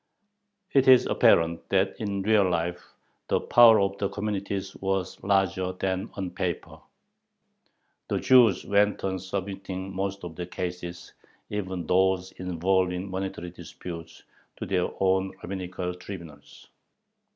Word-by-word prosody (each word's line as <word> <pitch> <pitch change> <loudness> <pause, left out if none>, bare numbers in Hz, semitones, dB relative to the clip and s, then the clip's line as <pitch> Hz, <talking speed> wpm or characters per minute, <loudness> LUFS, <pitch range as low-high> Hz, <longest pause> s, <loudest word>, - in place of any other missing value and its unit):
It 135 -1 +3
is 130 -1 +8
apparent 85 0 +3
that 95 0 +2
in 100 -2 -2
real 105 -2 +4
life 85 0 -2 0.4
the - - +2
power 115 -2 +7
of 100 0 0
the 100 - 0
communities 100 -1 -3
was 95 -1 -2
larger 95 -2 +1
than 95 +2 -2
on 95 -3 -4
paper. 90 -1 -4 1.3
The - - 0
Jews 120 -7 +5
went 100 0 +2
on 95 -1 -1
submitting 95 0 -5
most 100 +1 -3
of 85 -2 -7
their 90 +1 -5
cases, 90 -1 -6 0.4
even 95 -4 -3
those 95 +1 +2
involving 90 +1 0
monetary 95 -2 -4
disputes, 85 -1 -9 0.3
to - - -5
their 90 -2 0
own 95 0 +2
rabbinical 90 -1 -4
tribunals. 85 -6 -11
95 Hz, 125 wpm, -27 LUFS, 90-100 Hz, 1.3 s, is